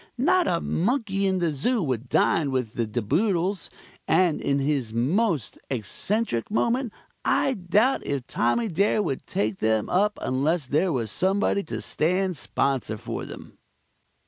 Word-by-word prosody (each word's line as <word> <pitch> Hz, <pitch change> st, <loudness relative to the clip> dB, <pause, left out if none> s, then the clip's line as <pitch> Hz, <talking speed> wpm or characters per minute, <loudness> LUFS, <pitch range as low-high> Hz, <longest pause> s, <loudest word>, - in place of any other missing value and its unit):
Not 355 Hz, +7 st, +3 dB
a 170 Hz, -, +1 dB
monkey 200 Hz, -, 0 dB
in 190 Hz, -1 st, +1 dB
the 170 Hz, -3 st, +1 dB
Zoo 205 Hz, -, 0 dB
would 130 Hz, -4 st, -2 dB
dine 155 Hz, -4 st, +2 dB
with 125 Hz, -4 st, -2 dB
the 115 Hz, -2 st, -1 dB
De 115 Hz, +2 st, -2 dB
Boodles, 185 Hz, -, 0 dB, 0.4 s
and 165 Hz, -1 st, +3 dB
in 140 Hz, -, +1 dB
his 135 Hz, -5 st, -1 dB
most 155 Hz, -, 0 dB
eccentric 130 Hz, -, -2 dB
moment 235 Hz, +3 st, 0 dB, 0.3 s
I 270 Hz, -, +2 dB
doubt 210 Hz, +7 st, +2 dB
if 140 Hz, -3 st, -3 dB
Tommy 175 Hz, -, +1 dB
Dare 200 Hz, +3 st, +2 dB
would 140 Hz, -8 st, -3 dB
take 105 Hz, -1 st, -1 dB
them 110 Hz, -1 st, +1 dB
up 205 Hz, +3 st, +2 dB
unless 145 Hz, +4 st, 0 dB
there 155 Hz, +8 st, +1 dB
was 115 Hz, -7 st, -1 dB
somebody 200 Hz, +2 st, +1 dB
to -, -, -5 dB
stand 185 Hz, +3 st, 0 dB
sponsor 135 Hz, -6 st, -1 dB
for -, -, -5 dB
them. -, -, -11 dB
165 Hz, 150 wpm, -25 LUFS, 130-205 Hz, 0.4 s, Not